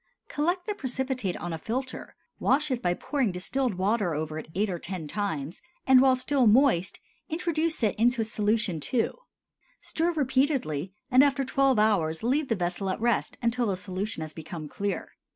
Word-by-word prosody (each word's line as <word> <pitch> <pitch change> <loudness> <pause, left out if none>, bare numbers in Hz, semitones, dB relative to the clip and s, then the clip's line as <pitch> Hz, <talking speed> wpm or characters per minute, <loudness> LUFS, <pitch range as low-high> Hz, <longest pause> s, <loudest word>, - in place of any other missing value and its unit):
Collect 350 +5 -1
the 420 - -1
precipitate 260 - -2
on 175 -1 -5
a 160 - -4
filter, 255 +8 -4 0.2
wash 295 +1 +2
it 250 -2 -1
by 175 -1 +1
pouring 270 -4 -1
distilled 225 +6 -1
water 190 -2 0
over 155 +1 -3
it - - -9
eight 205 +3 +1
or 180 -3 -3
ten 175 -3 -5
times, 165 -4 -3 0.2
and 260 -1 +7
while 260 -1 +5
still 255 -1 +2
moist 215 -6 +3 0.3
introduce 320 -3 -1
it 210 - +3
into 240 0 +3
solution 215 -4 0
II. 240 -3 +2 0.7
Stir 335 +2 -1
repeatedly, 260 - 0 0.2
and 255 +2 +7
after 280 -1 +2
twelve 270 -1 +2
hours 190 -7 +2
leave 275 +5 +1
the 225 - +1
vessel 180 +1 -2
at 185 - -2
rest 235 -1 0
until 235 0 +1
the 195 -2 -1
solution 190 -1 -3
has 155 -1 -5
become 160 -1 -7
clear. 200 +6 -3
225 Hz, 170 wpm, -27 LUFS, 180-265 Hz, 0.7 s, and